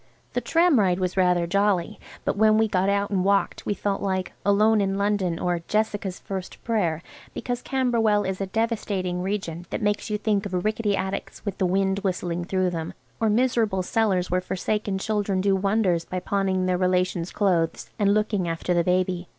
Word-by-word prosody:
The -, -, 0 dB
tram 335 Hz, -5 st, +3 dB
ride 185 Hz, -3 st, +2 dB
was 185 Hz, -1 st, -1 dB
rather 180 Hz, -2 st, +3 dB
jolly, 200 Hz, 0 st, +1 dB, 0.3 s
but -, -, 0 dB
when 215 Hz, +1 st, +4 dB
we 220 Hz, 0 st, +3 dB
got 190 Hz, -1 st, +1 dB
out 200 Hz, 0 st, 0 dB
and 190 Hz, -2 st, +1 dB
walked 200 Hz, +1 st, +1 dB
we 205 Hz, -, 0 dB
felt 200 Hz, -1 st, -2 dB
like 190 Hz, -2 st, -2 dB
"Alone 210 Hz, +2 st, +4 dB
in 195 Hz, 0 st, 0 dB
London," 200 Hz, -4 st, 0 dB
or 175 Hz, 0 st, -1 dB
"Jessica's 205 Hz, -3 st, -1 dB
First 190 Hz, -2 st, -7 dB
Prayer," 180 Hz, -8 st, 0 dB, 0.3 s
because 245 Hz, 0 st, -3 dB
Camberwell 230 Hz, -6 st, +1 dB
is 190 Hz, 0 st, -3 dB
a 195 Hz, -, -1 dB
devastating 195 Hz, -4 st, -1 dB
region 180 Hz, -3 st, -3 dB
that -, -, -3 dB
makes 205 Hz, 0 st, -1 dB
you 210 Hz, -, 0 dB
think 205 Hz, -1 st, 0 dB
of 180 Hz, -1 st, -3 dB
rickety 215 Hz, -1 st, +1 dB
attics 190 Hz, +3 st, -4 dB
with 200 Hz, -2 st, -4 dB
the 185 Hz, -, +2 dB
wind 190 Hz, +1 st, +1 dB
whistling 175 Hz, -3 st, -2 dB
through 185 Hz, 0 st, 0 dB
them, 165 Hz, -2 st, -5 dB, 0.2 s
or 225 Hz, -, +2 dB
miserable 220 Hz, -4 st, +1 dB
cellars 190 Hz, -3 st, +1 dB
where 180 Hz, 0 st, +2 dB
forsaken 195 Hz, +2 st, -2 dB
children 205 Hz, -1 st, -1 dB
do 195 Hz, +1 st, +2 dB
wonders 190 Hz, -3 st, +1 dB
by 185 Hz, -, -4 dB
pawning 190 Hz, -1 st, 0 dB
their 180 Hz, -1 st, +1 dB
relations' 180 Hz, -1 st, 0 dB
clothes 175 Hz, -5 st, 0 dB
and 200 Hz, -1 st, +3 dB
looking 210 Hz, -4 st, 0 dB
after 165 Hz, +2 st, -1 dB
the 170 Hz, -1 st, +2 dB
baby. 180 Hz, 0 st, 0 dB
195 Hz, 185 wpm, -25 LUFS, 180-210 Hz, 0.3 s, when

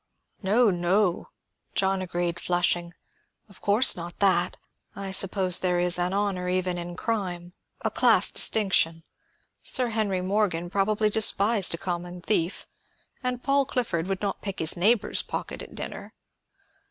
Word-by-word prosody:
"No, 215 Hz, +3 st, +3 dB
no," 180 Hz, +1 st, 0 dB, 0.5 s
John 190 Hz, 0 st, +1 dB
agreed, 175 Hz, -1 st, -3 dB
flushing. 175 Hz, -1 st, 0 dB, 0.5 s
"Of 200 Hz, -, -18 dB
course 210 Hz, +6 st, +4 dB
not 175 Hz, 0 st, -8 dB
that. 185 Hz, -3 st, +2 dB, 0.4 s
I 195 Hz, -1 st, -5 dB
suppose 190 Hz, -1 st, +2 dB
there 180 Hz, -1 st, 0 dB
is 175 Hz, 0 st, +1 dB
an 175 Hz, +1 st, 0 dB
honor 195 Hz, -2 st, -1 dB
even 180 Hz, -1 st, -1 dB
in 175 Hz, 0 st, -6 dB
crime, 180 Hz, -6 st, -3 dB, 0.3 s
a -, -, +1 dB
class -, -, +5 dB
distinction. 170 Hz, -6 st, +2 dB, 0.6 s
Sir 250 Hz, -2 st, +1 dB
Henry 210 Hz, -4 st, -1 dB
Morgan 185 Hz, -3 st, -1 dB
probably 210 Hz, +2 st, +1 dB
despised 210 Hz, -3 st, +3 dB
a -, -, -9 dB
common 175 Hz, 0 st, -5 dB
thief, 175 Hz, -2 st, -1 dB, 0.6 s
and 250 Hz, -1 st, -3 dB
Paul 275 Hz, 0 st, +2 dB
Clifford 230 Hz, -11 st, -2 dB
would 195 Hz, -1 st, -3 dB
not 200 Hz, -, -2 dB
pick 195 Hz, -2 st, -5 dB
his 160 Hz, -, +4 dB
neighbor's 210 Hz, +6 st, +2 dB
pocket -, -, -6 dB
at -, -, -11 dB
dinner. -, -, -8 dB
190 Hz, 140 wpm, -26 LUFS, 175-210 Hz, 0.6 s, class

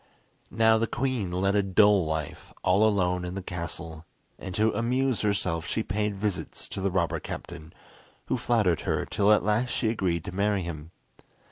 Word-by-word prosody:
Now 110 Hz, 0 st, +4 dB
the 115 Hz, -, +1 dB
queen 120 Hz, -8 st, -2 dB
led 95 Hz, +2 st, +1 dB
a 100 Hz, -, +4 dB
dull 100 Hz, -2 st, +4 dB
life 80 Hz, -2 st, -4 dB
all 100 Hz, +4 st, +4 dB
alone 90 Hz, -3 st, 0 dB
in 90 Hz, +1 st, -5 dB
the 100 Hz, -, -5 dB
castle, 85 Hz, -2 st, -6 dB, 0.3 s
and 95 Hz, -1 st, -6 dB
to 110 Hz, +1 st, +3 dB
amuse 125 Hz, +3 st, 0 dB
herself 90 Hz, -5 st, -1 dB
she 110 Hz, -, -1 dB
paid 105 Hz, +1 st, -1 dB
visits 100 Hz, -1 st, -3 dB
to 95 Hz, -, -5 dB
the 100 Hz, -, +1 dB
robber 85 Hz, -3 st, 0 dB
captain, 80 Hz, -2 st, -8 dB, 0.5 s
who -, -, 0 dB
flattered 105 Hz, -8 st, +1 dB
her -, -, -1 dB
till 100 Hz, 0 st, +2 dB
at 105 Hz, -, +4 dB
last 110 Hz, +4 st, +1 dB
she 110 Hz, -, 0 dB
agreed 90 Hz, -7 st, -1 dB
to 100 Hz, -, -5 dB
marry 100 Hz, 0 st, 0 dB
him. 80 Hz, -2 st, -7 dB
100 Hz, 175 wpm, -27 LUFS, 90-105 Hz, 0.5 s, Now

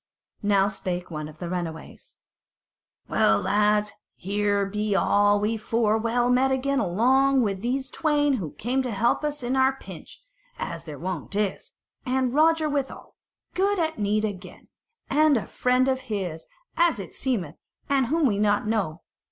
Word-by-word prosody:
Now 200 Hz, -1 st, +3 dB
spake 180 Hz, -3 st, -4 dB
one 155 Hz, -1 st, -5 dB
of 155 Hz, 0 st, -13 dB
the 175 Hz, -, -6 dB
runaways: 170 Hz, -3 st, -6 dB, 0.9 s
"Well, 105 Hz, 0 st, +3 dB
lads, 210 Hz, +1 st, +2 dB, 0.2 s
here 205 Hz, +1 st, 0 dB
be 210 Hz, +1 st, -1 dB
all 205 Hz, +1 st, +3 dB
we 215 Hz, +2 st, 0 dB
four 220 Hz, 0 st, +1 dB
well 235 Hz, +2 st, +1 dB
met 260 Hz, +2 st, +3 dB
again 270 Hz, +1 st, 0 dB
along 260 Hz, +8 st, +3 dB
with 195 Hz, -3 st, -2 dB
those 260 Hz, +3 st, -2 dB
twain 290 Hz, -3 st, +1 dB
who 165 Hz, -9 st, -5 dB
came 255 Hz, +5 st, -1 dB
to 255 Hz, -, -3 dB
help 230 Hz, +6 st, +1 dB
us 295 Hz, -3 st, -2 dB
at 245 Hz, +2 st, -1 dB
our 265 Hz, 0 st, +3 dB
pinch, 270 Hz, -, -12 dB, 0.4 s
as 170 Hz, -1 st, -5 dB
their 150 Hz, -3 st, -8 dB
wont 185 Hz, +3 st, -5 dB
is, 205 Hz, -2 st, -2 dB, 0.3 s
and 255 Hz, -1 st, 0 dB
Roger 315 Hz, +1 st, +3 dB
withal, 285 Hz, -2 st, -4 dB, 0.4 s
good 395 Hz, +2 st, +1 dB
at 320 Hz, -6 st, -1 dB
need 210 Hz, +1 st, +1 dB
again, 185 Hz, -3 st, -8 dB, 0.4 s
and 300 Hz, -1 st, +4 dB
a 220 Hz, -, -3 dB
friend 250 Hz, +1 st, +1 dB
of 260 Hz, -1 st, 0 dB
his, 190 Hz, -10 st, -4 dB, 0.3 s
as 340 Hz, -4 st, +3 dB
it 195 Hz, -4 st, -8 dB
seemeth, 190 Hz, -, -2 dB, 0.3 s
and 275 Hz, -3 st, +2 dB
whom 315 Hz, +4 st, +1 dB
we 205 Hz, -6 st, +1 dB
know 205 Hz, -1 st, +3 dB
not. 210 Hz, -7 st, -2 dB
220 Hz, 160 wpm, -25 LUFS, 195-265 Hz, 0.9 s, and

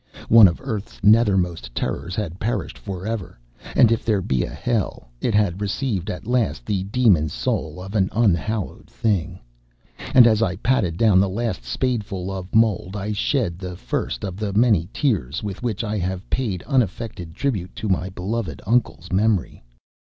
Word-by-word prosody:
One 115 Hz, -3 st, +9 dB
of 85 Hz, -, -2 dB
earth's 110 Hz, +1 st, -5 dB
nethermost 95 Hz, -, +3 dB
terrors 90 Hz, +2 st, -3 dB
had 95 Hz, -4 st, -4 dB
perished 120 Hz, +4 st, -2 dB
for 95 Hz, -2 st, -7 dB
ever; 110 Hz, -, -4 dB, 0.4 s
and 115 Hz, -, +6 dB
if 115 Hz, -, +1 dB
there 105 Hz, -4 st, +1 dB
be 65 Hz, -6 st, 0 dB
a -, -, -4 dB
hell, 110 Hz, -, -2 dB
it 115 Hz, -, +1 dB
had 100 Hz, -3 st, +1 dB
received 105 Hz, -2 st, -2 dB
at 100 Hz, 0 st, -5 dB
last 115 Hz, -, 0 dB
the 100 Hz, -3 st, -1 dB
demon 100 Hz, -8 st, +3 dB
soul 75 Hz, +3 st, -2 dB
of 95 Hz, +2 st, -8 dB
an 95 Hz, -3 st, +2 dB
unhallowed 105 Hz, -2 st, 0 dB
thing. 95 Hz, -5 st, -1 dB, 0.8 s
And 125 Hz, -2 st, +9 dB
as 110 Hz, -2 st, +4 dB
I 95 Hz, -5 st, +1 dB
patted 95 Hz, -10 st, 0 dB
down 105 Hz, -4 st, +5 dB
the 95 Hz, 0 st, +3 dB
last 105 Hz, -, -2 dB
spadeful 100 Hz, -, -2 dB
of 95 Hz, +1 st, -6 dB
mold, 105 Hz, -4 st, +2 dB
I 105 Hz, +1 st, -3 dB
shed 105 Hz, -, 0 dB
the 90 Hz, -2 st, -6 dB
first -, -, -3 dB
of 95 Hz, -2 st, -5 dB
the 105 Hz, -1 st, -2 dB
many 105 Hz, -6 st, +3 dB
tears 90 Hz, -, -1 dB
with 100 Hz, -3 st, -5 dB
which 115 Hz, -3 st, -2 dB
I 105 Hz, -1 st, -2 dB
have 95 Hz, +1 st, -3 dB
paid 105 Hz, -9 st, -1 dB
unaffected 110 Hz, -, -2 dB
tribute 105 Hz, -11 st, -2 dB
to 110 Hz, -, -4 dB
my 95 Hz, -1 st, 0 dB
beloved 95 Hz, -, -4 dB
uncle's 95 Hz, -, 0 dB
memory. 100 Hz, -1 st, +1 dB
100 Hz, 170 wpm, -22 LUFS, 90-115 Hz, 0.8 s, One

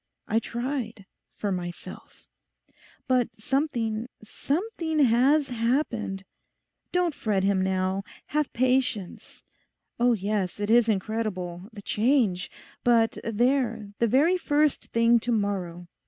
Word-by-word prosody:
I 220 Hz, -, +2 dB
tried: 235 Hz, -4 st, -4 dB, 0.3 s
for 205 Hz, -, -2 dB
myself. 175 Hz, -2 st, -7 dB, 0.8 s
But 255 Hz, -2 st, +2 dB
something—something 275 Hz, -, -2 dB
has 270 Hz, +2 st, +4 dB
happened. 230 Hz, -5 st, -1 dB, 0.7 s
Don't 360 Hz, -2 st, +1 dB
fret 205 Hz, -7 st, -1 dB
him 195 Hz, -1 st, +2 dB
now. 190 Hz, 0 st, 0 dB, 0.2 s
Have 300 Hz, -1 st, -1 dB
patience. 250 Hz, -6 st, -1 dB, 0.6 s
Oh 245 Hz, 0 st, +4 dB
yes, 200 Hz, -2 st, -2 dB
it 205 Hz, +1 st, -1 dB
is 235 Hz, -1 st, +5 dB
incredible... 195 Hz, -3 st, -2 dB
the 205 Hz, -3 st, -11 dB
change! 210 Hz, -7 st, +1 dB, 0.3 s
But 230 Hz, -2 st, +3 dB
there, 230 Hz, -2 st, 0 dB
the 235 Hz, -, +3 dB
very 300 Hz, -, +3 dB
first 295 Hz, -2 st, +1 dB
thing 230 Hz, +1 st, +4 dB
to 240 Hz, +2 st, -3 dB
morrow. 190 Hz, -5 st, -2 dB
230 Hz, 110 wpm, -26 LUFS, 200-260 Hz, 0.8 s, is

